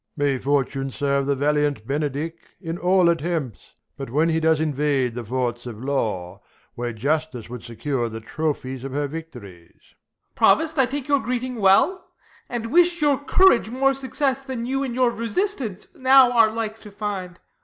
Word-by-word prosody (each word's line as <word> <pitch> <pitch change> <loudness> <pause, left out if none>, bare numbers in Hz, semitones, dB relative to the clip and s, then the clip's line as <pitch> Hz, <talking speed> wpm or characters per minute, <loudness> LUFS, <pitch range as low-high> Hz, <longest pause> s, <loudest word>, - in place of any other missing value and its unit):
Prov. 145 - +1
May 135 -2 +1
fortune 135 0 0
serve 140 0 -1
the 140 - +2
valiant 145 -4 0
Benedick 145 +3 -2 0.3
In 170 -1 -5
all 180 0 +3
attempts, 165 - -2 0.2
but 135 -2 -6
wlien 155 +6 +2
he 160 - +1
does 160 -1 +2
invade 145 -5 0
The 120 0 -5
forts 120 +1 -3
of 115 -3 -7
law, 110 -10 -2 0.3
where 120 0 -4
justice 135 0 -2
would 125 -2 -6
secure 120 +1 -3
The 110 0 -6
trophies 130 0 -3
of 135 -1 -6
her 145 +1 0
victories. 120 - -10
Ben. - - -35 0.4
Provost, 320 -1 +3
I 265 - +4
take 275 +2 -5
your 285 -1 +3
greeting 250 0 -3
well, 215 - +3 0.4
and 230 -2 -4
wish 345 +1 +4
Your 285 -2 +2
courage 285 - +4
more 270 +3 +2
success, 270 0 -1
than 260 -3 -5
you 270 +2 -1
in 260 -4 -3
your 250 -1 +3
Resistance 235 - -3
now 260 -1 +6
are 230 -3 +5
like 220 -1 -4
to 210 - -12
find. 195 -3 -5
160 Hz, 175 wpm, -23 LUFS, -, 0.4 s, now